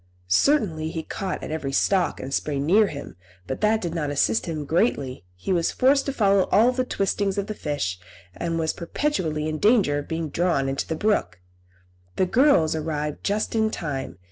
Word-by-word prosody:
Certainly 165 Hz, -, +2 dB
he 160 Hz, -1 st, -4 dB
caught 190 Hz, +2 st, -4 dB
at -, -, -5 dB
every 150 Hz, -3 st, -3 dB
stalk 185 Hz, +5 st, +1 dB
and 135 Hz, +1 st, -6 dB
spray 145 Hz, 0 st, -1 dB
near 195 Hz, +9 st, +4 dB
him, 140 Hz, -, -8 dB, 0.3 s
but 130 Hz, -, -5 dB
that 215 Hz, +1 st, +3 dB
did 170 Hz, -2 st, -3 dB
not 155 Hz, -4 st, -2 dB
assist 115 Hz, -6 st, +1 dB
him 155 Hz, -3 st, -3 dB
greatly; 140 Hz, -, 0 dB
he 90 Hz, -, -2 dB
was 170 Hz, -2 st, +1 dB
forced 275 Hz, +2 st, +3 dB
to -, -, +1 dB
follow 200 Hz, -6 st, +2 dB
all 235 Hz, +4 st, +5 dB
the 255 Hz, 0 st, -1 dB
twistings 200 Hz, -3 st, -1 dB
of 200 Hz, -, 0 dB
the 215 Hz, -, -4 dB
fish, 145 Hz, -, -3 dB, 0.4 s
and 165 Hz, -1 st, -2 dB
was 160 Hz, -1 st, 0 dB
perpetually 170 Hz, -, -2 dB
in 155 Hz, -1 st, -3 dB
danger 205 Hz, -10 st, +3 dB
of 145 Hz, -, -8 dB
being 160 Hz, -1 st, -3 dB
drawn 165 Hz, -4 st, +1 dB
into 135 Hz, 0 st, -2 dB
the 160 Hz, -, -2 dB
brook. 155 Hz, -, 0 dB, 0.8 s
The 185 Hz, -, +2 dB
girls 230 Hz, -, +4 dB
arrived 150 Hz, -1 st, -3 dB
just 210 Hz, +1 st, -1 dB
in 220 Hz, -1 st, +2 dB
time. 135 Hz, -, -4 dB
165 Hz, 190 wpm, -24 LUFS, 145-205 Hz, 0.8 s, all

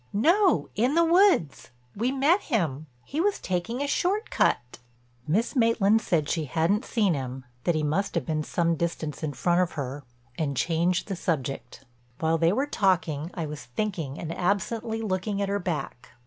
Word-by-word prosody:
"No, 345 Hz, -, +3 dB
in 250 Hz, +7 st, +1 dB
the 335 Hz, 0 st, +5 dB
woods. 345 Hz, -, +3 dB, 0.3 s
We 235 Hz, +5 st, 0 dB
met 285 Hz, +8 st, +3 dB
him. 160 Hz, -, -1 dB, 0.2 s
He 300 Hz, +4 st, -2 dB
was 405 Hz, +2 st, +1 dB
taking 190 Hz, +9 st, -2 dB
a -, -, -2 dB
short 395 Hz, +9 st, 0 dB
cut." 125 Hz, +1 st, +1 dB, 0.5 s
Miss 215 Hz, -, +1 dB
Maitland 225 Hz, -3 st, +3 dB
said 160 Hz, -8 st, 0 dB
she 160 Hz, -1 st, -1 dB
hadn't 170 Hz, -, +1 dB
seen 205 Hz, -7 st, +2 dB
him, 130 Hz, -2 st, -5 dB, 0.2 s
that 175 Hz, -, +2 dB
he 155 Hz, -, 0 dB
must 160 Hz, +7 st, 0 dB
have -, -, 0 dB
been 155 Hz, -2 st, -1 dB
some 170 Hz, +1 st, 0 dB
distance 160 Hz, -2 st, -3 dB
in 155 Hz, -3 st, -2 dB
front 175 Hz, +7 st, +2 dB
of 180 Hz, -, -1 dB
her, 140 Hz, 0 st, -5 dB, 0.4 s
and 140 Hz, -4 st, -1 dB
changed 170 Hz, +5 st, +1 dB
the 195 Hz, -, -3 dB
subject. 135 Hz, -5 st, -3 dB, 0.3 s
While 160 Hz, 0 st, +1 dB
they 165 Hz, +1 st, +4 dB
were 265 Hz, +8 st, +1 dB
talking 175 Hz, -, 0 dB
I 170 Hz, -3 st, -2 dB
was 150 Hz, -2 st, -7 dB
thinking 160 Hz, -, -3 dB
and 165 Hz, 0 st, -5 dB
absently 220 Hz, +4 st, -1 dB
looking 200 Hz, 0 st, -1 dB
at 200 Hz, -1 st, -1 dB
her 200 Hz, 0 st, 0 dB
back. 155 Hz, -8 st, -4 dB
180 Hz, 175 wpm, -26 LUFS, 155-225 Hz, 0.5 s, the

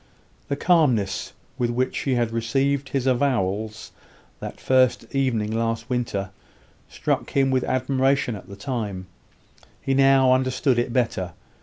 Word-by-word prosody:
The 140 Hz, -, -1 dB
calmness 115 Hz, -, +2 dB, 0.3 s
with 120 Hz, -1 st, +1 dB
which 125 Hz, +2 st, -1 dB
she 135 Hz, -2 st, 0 dB
had 120 Hz, -2 st, 0 dB
received 135 Hz, +5 st, 0 dB
his 135 Hz, -2 st, -1 dB
avowals 110 Hz, -5 st, 0 dB, 0.5 s
that -, -, -7 dB
first 130 Hz, -1 st, +2 dB
evening 120 Hz, -6 st, 0 dB
last 115 Hz, +2 st, -2 dB
winter, 105 Hz, -6 st, -2 dB, 0.6 s
struck -, -, -2 dB
him 135 Hz, -1 st, +2 dB
with 130 Hz, -1 st, +2 dB
admiration 130 Hz, -1 st, +1 dB
at 100 Hz, -, -11 dB
the 100 Hz, -, -8 dB
time: 105 Hz, -5 st, -4 dB, 0.7 s
he 135 Hz, -, -1 dB
now 135 Hz, -1 st, +5 dB
understood 130 Hz, 0 st, +1 dB
it 120 Hz, 0 st, -1 dB
better. 115 Hz, -8 st, -1 dB
125 Hz, 135 wpm, -24 LUFS, 110-135 Hz, 0.7 s, now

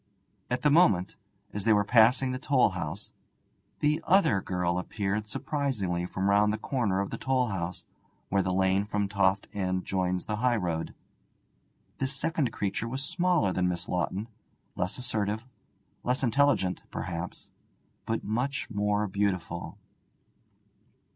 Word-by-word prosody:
At 125 Hz, +1 st, -1 dB
the 150 Hz, -, +5 dB
moment, 105 Hz, -, +4 dB, 0.4 s
as 105 Hz, -, -3 dB
they 110 Hz, -, +5 dB
were 105 Hz, -1 st, +4 dB
passing 125 Hz, +4 st, +4 dB
the 130 Hz, -, -3 dB
toll 130 Hz, -3 st, +3 dB
house, 90 Hz, +1 st, -5 dB, 0.7 s
the 150 Hz, +2 st, +2 dB
other 170 Hz, -, +4 dB
girl 90 Hz, -1 st, -1 dB
appeared 105 Hz, +2 st, -2 dB
surprisingly 105 Hz, -, -2 dB
from 95 Hz, +1 st, -2 dB
round 105 Hz, +1 st, +4 dB
the 110 Hz, -, -1 dB
corner 105 Hz, -9 st, 0 dB
of 100 Hz, -, -4 dB
the -, -, -5 dB
toll 130 Hz, -2 st, +1 dB
house, 90 Hz, -3 st, -4 dB, 0.5 s
where 100 Hz, 0 st, +3 dB
the 95 Hz, -, -1 dB
lane 95 Hz, +1 st, +2 dB
from 105 Hz, -1 st, -1 dB
Toft 100 Hz, -1 st, +1 dB
End 95 Hz, -2 st, -1 dB
joins 90 Hz, -1 st, -1 dB
the 105 Hz, -, -2 dB
highroad. 100 Hz, -9 st, 0 dB, 1.0 s
This 135 Hz, +1 st, -1 dB
second 150 Hz, -4 st, 0 dB
creature 105 Hz, +1 st, -2 dB
was 130 Hz, +3 st, -3 dB
smaller 175 Hz, -, +1 dB
than 90 Hz, -1 st, +1 dB
Miss 90 Hz, 0 st, -3 dB
Lawton, 95 Hz, +4 st, -1 dB, 0.5 s
less 90 Hz, +3 st, -2 dB
assertive, 110 Hz, -3 st, -2 dB, 0.6 s
less 125 Hz, +2 st, 0 dB
intelligent, 125 Hz, -8 st, +2 dB
perhaps, 85 Hz, 0 st, -5 dB, 0.6 s
but 115 Hz, -, -1 dB
much 125 Hz, +5 st, -2 dB
more 105 Hz, 0 st, +1 dB
beautiful. 100 Hz, -3 st, -2 dB
105 Hz, 140 wpm, -29 LUFS, 95-125 Hz, 1.0 s, the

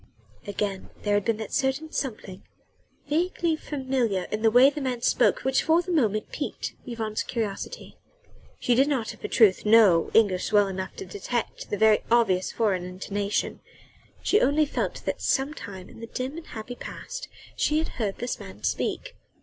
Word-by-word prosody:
Again 200 Hz, -1 st, -3 dB
there 205 Hz, -, +1 dB
had 205 Hz, -1 st, +2 dB
been 230 Hz, -2 st, +1 dB
that 220 Hz, -1 st, -6 dB
certain 270 Hz, +4 st, 0 dB
something 210 Hz, -7 st, -4 dB, 0.7 s
vaguely 335 Hz, +1 st, +1 dB
familiar 260 Hz, -10 st, -1 dB
in 215 Hz, -, -2 dB
the 225 Hz, -, +5 dB
way 250 Hz, +5 st, +7 dB
the 295 Hz, -, -5 dB
man 250 Hz, -3 st, -2 dB
spoke -, -, +3 dB
which 265 Hz, 0 st, +2 dB
for 330 Hz, +2 st, +3 dB
the 365 Hz, -, -4 dB
moment 220 Hz, -, +1 dB
piqued -, -, -4 dB
Yvonne's 220 Hz, -3 st, -2 dB
curiosity. 225 Hz, -, -4 dB, 0.6 s
She 245 Hz, -, +2 dB
did 265 Hz, +4 st, +4 dB
not, 260 Hz, -7 st, -1 dB
of -, -, -18 dB
a -, -, -1 dB
truth, 210 Hz, -5 st, +4 dB
know 210 Hz, -6 st, +6 dB
English 200 Hz, -4 st, +3 dB
well 205 Hz, -1 st, +5 dB
enough 190 Hz, 0 st, -5 dB
to -, -, -7 dB
detect 205 Hz, +5 st, -4 dB
the 205 Hz, -, -1 dB
very 220 Hz, 0 st, +5 dB
obvious 205 Hz, -6 st, +3 dB
foreign 200 Hz, -6 st, 0 dB
intonation; 200 Hz, +3 st, -2 dB, 0.6 s
she 420 Hz, -, +3 dB
only 300 Hz, +2 st, +3 dB
felt 290 Hz, -, -3 dB
that -, -, -2 dB
sometime 235 Hz, -10 st, -2 dB
in -, -, -14 dB
the 230 Hz, -, -7 dB
dim 255 Hz, +4 st, -4 dB
and 335 Hz, -, -8 dB
happy 220 Hz, +3 st, -7 dB
past -, -, -7 dB, 0.3 s
she 300 Hz, -, +1 dB
had 320 Hz, -, 0 dB
heard 205 Hz, -4 st, -1 dB
this 245 Hz, -, -3 dB
man -, -, -11 dB
speak. -, -, -2 dB
230 Hz, 175 wpm, -26 LUFS, 205-270 Hz, 0.7 s, way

